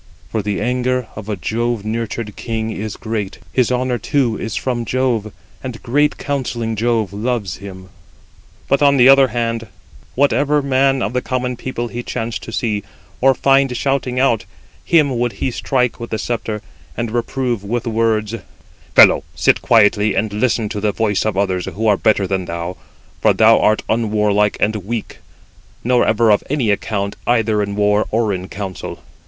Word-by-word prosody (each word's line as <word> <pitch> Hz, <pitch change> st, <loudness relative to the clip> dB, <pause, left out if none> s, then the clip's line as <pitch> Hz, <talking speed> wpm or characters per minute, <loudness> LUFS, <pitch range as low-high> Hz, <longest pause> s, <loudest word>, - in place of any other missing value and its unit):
For 110 Hz, -, 0 dB
the 105 Hz, -1 st, -2 dB
anger 125 Hz, +1 st, 0 dB
of 110 Hz, 0 st, -8 dB
a 105 Hz, -, -1 dB
Jove 115 Hz, +2 st, -2 dB
nurtured 110 Hz, -1 st, -3 dB
king 110 Hz, -1 st, -3 dB
is 110 Hz, 0 st, -5 dB
great; 110 Hz, -3 st, -4 dB, 0.2 s
his 125 Hz, -2 st, +2 dB
honour 125 Hz, -1 st, 0 dB
too 130 Hz, -7 st, +1 dB
is 110 Hz, -, -4 dB
from 125 Hz, -2 st, -2 dB
Jove, 115 Hz, -2 st, -1 dB, 0.3 s
and 125 Hz, -4 st, -7 dB
great 145 Hz, +5 st, +1 dB
counselling 120 Hz, -5 st, -2 dB
Jove 110 Hz, -3 st, 0 dB
loves 105 Hz, -3 st, -2 dB
him." 95 Hz, -2 st, -10 dB, 0.8 s
But 140 Hz, +1 st, +2 dB
on 140 Hz, -1 st, +5 dB
the 125 Hz, 0 st, +6 dB
other 135 Hz, 0 st, +7 dB
hand, 115 Hz, -1 st, -2 dB, 0.5 s
whatever 145 Hz, +2 st, +2 dB
man 135 Hz, -1 st, +2 dB
of 100 Hz, +4 st, -2 dB
the 125 Hz, -, 0 dB
common 125 Hz, -1 st, -2 dB
people 120 Hz, -1 st, -4 dB
he 120 Hz, -, -5 dB
chanced 115 Hz, -1 st, -4 dB
to -, -, -8 dB
see, 110 Hz, -2 st, -1 dB, 0.4 s
or 135 Hz, +1 st, +5 dB
find 135 Hz, -2 st, +3 dB
shouting 135 Hz, -2 st, -1 dB
out, 125 Hz, -5 st, +2 dB, 0.4 s
him 145 Hz, -7 st, +3 dB
would 120 Hz, -1 st, 0 dB
he 130 Hz, -, -2 dB
strike 125 Hz, 0 st, 0 dB
with 115 Hz, -, -6 dB
the 110 Hz, -, -2 dB
sceptre, 110 Hz, -1 st, -3 dB, 0.3 s
and 115 Hz, -2 st, -2 dB
reprove 120 Hz, -1 st, -2 dB
with 115 Hz, +3 st, -2 dB
words: 110 Hz, -1 st, 0 dB, 0.6 s
"Fellow, -, -, +7 dB
sit -, -, +3 dB
quietly, 105 Hz, -1 st, +4 dB
and 110 Hz, -1 st, -1 dB
listen 110 Hz, 0 st, +1 dB
to 105 Hz, -, -4 dB
the 105 Hz, 0 st, +1 dB
voice 105 Hz, -2 st, 0 dB
of 110 Hz, -3 st, -1 dB
others, 95 Hz, -3 st, 0 dB
who 110 Hz, +3 st, -3 dB
are 105 Hz, -2 st, +5 dB
better 105 Hz, 0 st, +2 dB
than 95 Hz, -1 st, -2 dB
thou; 85 Hz, +1 st, -4 dB, 0.5 s
for -, -, +4 dB
thou -, -, +5 dB
art 110 Hz, 0 st, +2 dB
unwarlike 105 Hz, -2 st, +1 dB
and 110 Hz, +1 st, +1 dB
weak, 110 Hz, +3 st, -5 dB, 0.6 s
nor 125 Hz, 0 st, +3 dB
ever 110 Hz, 0 st, +3 dB
of 105 Hz, -, +3 dB
any 130 Hz, -7 st, +1 dB
account 100 Hz, -1 st, -2 dB
either 110 Hz, -3 st, +2 dB
in 100 Hz, 0 st, -3 dB
war 105 Hz, +1 st, +2 dB
or 110 Hz, -2 st, +1 dB
in 95 Hz, 0 st, -4 dB
council. 95 Hz, -2 st, -6 dB
115 Hz, 170 wpm, -18 LUFS, 105-125 Hz, 0.8 s, other